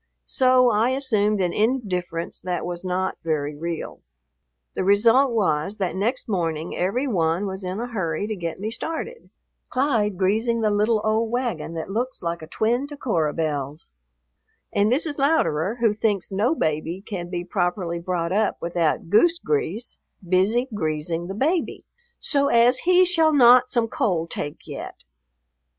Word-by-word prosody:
So 255 -2 +4
I 220 +3 +2
assumed 215 -6 +1
an 175 -2 0
indifference 190 -8 -2
that 180 -1 -3
was 175 0 -5
not 185 +1 -2
very 150 -3 -1
real. 165 +2 -5 0.7
The - - -2
result 225 +8 +4
was 195 -3 0
that 190 -4 -2
next 230 +7 -1
morning 165 -5 -2
every 200 +10 0
one 175 - 0
was 190 0 -5
in 185 +3 -4
a 240 - -2
hurry 190 -7 -2
to 215 0 -3
get 170 -3 -5
me 215 +3 -3
started, 330 - -5 0.4
Clyde 230 -7 +1
greasing 220 +5 +1
the 215 -1 +2
little 210 +1 +2
old 220 +1 +1
wagon 230 -10 -3
that 165 +4 -5
looks 245 +3 -3
like 170 0 -3
a 155 - -9
twin 240 - 0
to 290 0 -9
Cora 165 - 0
Belle's, 150 -2 -4 0.8
and 205 +2 +2
Mrs. 290 +2 0
Louderer, 225 - +1
who 225 -3 +3
thinks 205 -3 -1
no 220 +11 +1
baby 160 - -2
can 175 -4 -5
be 175 -1 -3
properly 175 -1 -2
brought 170 -1 -2
up 210 +2 +1
without 170 +1 -1
goose 335 +11 +5
grease, 370 - -2 0.3
busy 200 +8 +2
greasing 165 -1 -2
the 195 - -5
baby 315 - -1 0.3
"so 280 -1 +2
as 245 0 +4
he 365 0 +6
shall 325 -3 +3
not 250 -2 +6
some 235 -2 +1
cold 170 -7 -1
take 145 - -4
yet." - - -8
205 Hz, 160 wpm, -23 LUFS, 170-245 Hz, 0.8 s, he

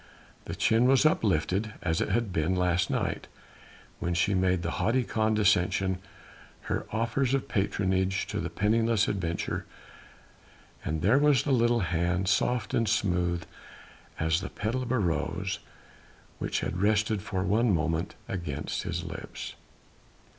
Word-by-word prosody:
The - - -5
chin 115 +2 +3
was 135 +3 +4
uplifted 105 - +1
as 80 -2 0
it - - -1
had 115 -5 0
been 85 +3 +1
last 90 -1 +1
night, - - -2 0.7
when 85 0 -1
she 90 +4 +2
made 90 -2 +2
with 85 - -1
haughty 125 +3 +2
condescension 100 -4 +2 0.6
her - - -3
offers 120 +4 +1
of 135 - -2
patronage 95 -2 0
to - - -4
the - - -3
penniless 110 +1 +2
adventurer, 85 -4 -2 1.2
and 80 0 -2
there 115 +9 +5
was 145 -3 +4
the 145 - -1
little 120 -2 +3
hand 90 +1 0
soft 120 +3 +1
and 115 -2 +2
smooth 90 -5 +1 0.8
as 80 +2 +1
the - - -5
petal 115 +5 -2
of 125 -1 -4
a 130 - +2
rose 95 +1 -1 0.8
which - - -1
had 90 +3 -3
rested 105 0 +2
for 95 -2 -2
one 110 +4 +2
moment 80 0 0
against 75 -6 -3
his - - -3
lips. - - -7
100 Hz, 140 wpm, -28 LUFS, 90-115 Hz, 1.2 s, there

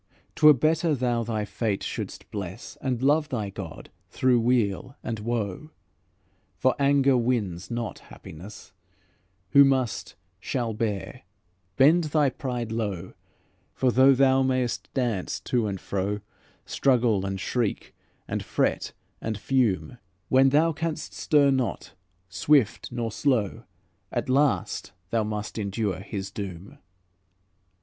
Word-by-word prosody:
'T - - -10
were - - +11
better 155 +3 +2
thou 120 -2 0
thy 110 -2 -2
fate 100 0 -2
shouldst - - -6
bless, 95 -3 -6
And 130 -2 -2
love 150 +2 +3
thy 110 -7 -3
God, 95 -5 -8 0.2
through 125 -2 +2
weal 120 +1 0
and 115 -2 -3
woe; 110 +3 -3 0.9
For 130 0 +3
anger 140 -1 +4
wins 115 -8 -1
not 120 -2 -4
happiness; 95 +4 -12 0.8
Who 140 - +8
must, 130 -4 0 0.2
shall 120 +1 -2
bear; 105 -3 -3 0.6
bend 155 +5 +5
thy 150 -2 +2
pride 125 -6 -4
low; 100 -6 -3 0.6
For 130 -1 +2
though 130 +2 +6
thou 135 0 +4
mayst 130 -2 -1
dance 120 -8 -1
to 120 -4 0
and 100 -2 -3
fro, 100 +2 -2 0.4
Struggle 120 -7 +2
and 95 0 -3
shriek, 115 +2 -2 0.3
and - - -2
fret - - -1 0.3
and 110 -2 -3
fume, 125 0 0 0.3
When 135 +1 +5
thou 155 +4 +3
canst 160 0 -4
stir 145 -4 +3
not, 130 -3 -2 0.3
swift 125 +4 +2
nor 120 -2 -3
slow, 115 -4 0 0.5
At - - -2
last, 130 -8 +1 0.2
thou 115 -1 +2
must 105 +1 -4
endure 100 -2 -2
His 95 0 -6
doom." 100 - -7
120 Hz, 125 wpm, -26 LUFS, 105-135 Hz, 0.9 s, were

